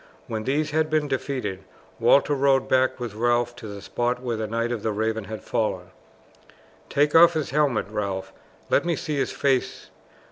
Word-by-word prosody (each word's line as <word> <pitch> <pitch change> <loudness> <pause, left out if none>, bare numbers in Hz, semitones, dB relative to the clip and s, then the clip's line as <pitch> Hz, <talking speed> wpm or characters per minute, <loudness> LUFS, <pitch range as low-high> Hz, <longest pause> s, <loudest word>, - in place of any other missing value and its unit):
When 110 -1 -4
these 150 +3 0
had 155 +1 +1
been 155 -1 +1
defeated 125 -8 -3 0.4
Walter 140 +1 +4
rode 135 -1 +2
back 130 0 +2
with 120 -4 -5
Ralph 120 +2 +1
to 120 -3 -8
the 100 -1 -8
spot 120 +3 -1
where 125 -2 -3
the 110 0 -3
Knight 115 +2 -1
of 120 -3 -3
the 110 - -1
Raven 110 0 -1
had 110 -1 -7
fallen. 95 -5 -2 1.0
"Take 145 +1 +2
off 170 +1 +7
his 155 -5 -2
helmet, 140 -6 +1
Ralph. 95 -2 -4 0.4
Let - - +4
me 170 -1 0
see 150 0 -3
his 135 - 0
face. 135 -3 -1
120 Hz, 180 wpm, -24 LUFS, 110-140 Hz, 1.0 s, off